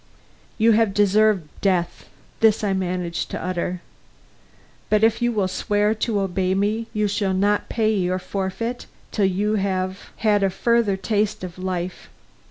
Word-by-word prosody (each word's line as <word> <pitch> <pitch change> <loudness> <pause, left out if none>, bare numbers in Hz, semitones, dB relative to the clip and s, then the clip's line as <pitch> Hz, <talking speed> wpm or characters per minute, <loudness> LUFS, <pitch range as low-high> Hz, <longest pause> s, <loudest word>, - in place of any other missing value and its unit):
"You 230 +1 +4
have 220 -2 +2
deserved 205 -3 +3
death." 180 -3 0 0.3
This 220 -1 +4
I 200 -2 +1
managed 180 -2 -2
to - - -4
utter. 180 0 -3 1.1
"But 215 0 +3
if 225 +1 +3
you 240 0 +2
will 205 -4 0
swear 205 +3 +1
to 220 -2 -1
obey 190 0 0
me, 215 +3 0
you 210 -1 0
shall 200 -2 0
not 205 +2 +1
pay 220 -1 +1
your 185 -2 0
forfeit 195 +6 -4 0.2
till 205 - +1
you 205 +3 0
have 190 -1 -2
had 210 -2 +2
a 195 - +3
further 230 0 +1
taste 210 +1 -1
of 180 0 -7
life. 185 -1 -4
200 Hz, 155 wpm, -22 LUFS, 185-215 Hz, 1.1 s, You